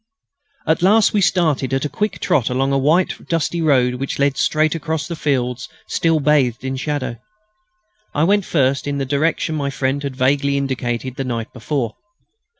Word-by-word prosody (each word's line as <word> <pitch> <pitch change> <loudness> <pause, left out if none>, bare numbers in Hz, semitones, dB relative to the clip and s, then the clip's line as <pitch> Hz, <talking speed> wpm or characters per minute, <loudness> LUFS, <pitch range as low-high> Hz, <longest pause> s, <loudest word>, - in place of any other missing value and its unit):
At 160 +1 +1
last 205 +4 +4
we 205 - +2
started 155 -8 +1
at 135 - -1
a 145 -1 -5
quick 210 +1 -1
trot 130 -4 +1
along 135 +2 0
a - - +3
white 160 +7 +2
and - - -18
dusty 165 +1 -1
road 130 -5 +3
which 135 - -3
led 140 0 +2
straight 155 0 +1
across 160 -2 -3
fields 135 -6 -2 0.2
still 165 -1 +1
bathed 135 -5 +2
in 130 0 -2
shadow. 135 -3 -3 1.0
I 150 - +2
went 200 +4 +3
first 140 -5 +1
in 140 0 -1
the 135 - -1
direction 155 +4 0
my 145 -2 -1
friend 135 0 -1
had 140 -2 -4
vaguely 140 +2 +1
indicated 130 -2 -3
the 135 - -2
night 115 -3 -4
before. 125 -2 -2
140 Hz, 175 wpm, -19 LUFS, 130-155 Hz, 1.0 s, last